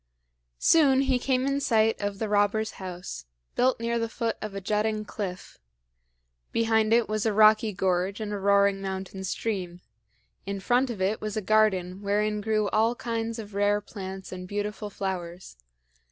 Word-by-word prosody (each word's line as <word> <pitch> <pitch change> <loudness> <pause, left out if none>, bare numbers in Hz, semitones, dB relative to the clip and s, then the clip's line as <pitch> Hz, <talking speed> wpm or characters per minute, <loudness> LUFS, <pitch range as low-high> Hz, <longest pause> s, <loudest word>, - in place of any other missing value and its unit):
Soon 275 - +5
he 265 -2 +2
came 255 0 +1
in 275 0 +1
sight 225 -4 +2
of 205 -1 -2
the 220 - -2
robber's 210 +1 +1
house, 180 - -7 0.3
built 255 -1 +2
near 235 0 -1
the 230 0 -2
foot 230 0 -2
of 215 -2 -5
a - - -2
jutting 215 +2 -1
cliff. 195 -3 -6 0.9
Behind 225 -1 +2
it 235 0 +4
was 215 +1 -1
a 215 - +1
rocky 215 +1 +5
gorge 190 +1 0
and 210 -1 -4
a 205 - -3
roaring 200 0 +3
mountain 190 0 -5
stream; 190 -2 -3 0.7
and 200 - -2
in - - -5
front 250 +6 +2
of 210 -6 -3
it 205 +3 0
was 215 0 -4
a - - +2
garden 195 -3 +2
wherein 210 +1 0
grew 215 -1 +1
all 225 +2 +2
kinds 230 -1 -3
of 210 -2 -8
rare 205 +1 +2
plants 190 -2 -8
and 180 0 -7
beautiful 205 +1 -4
flowers. 185 - -5
210 Hz, 170 wpm, -27 LUFS, 195-225 Hz, 0.9 s, Soon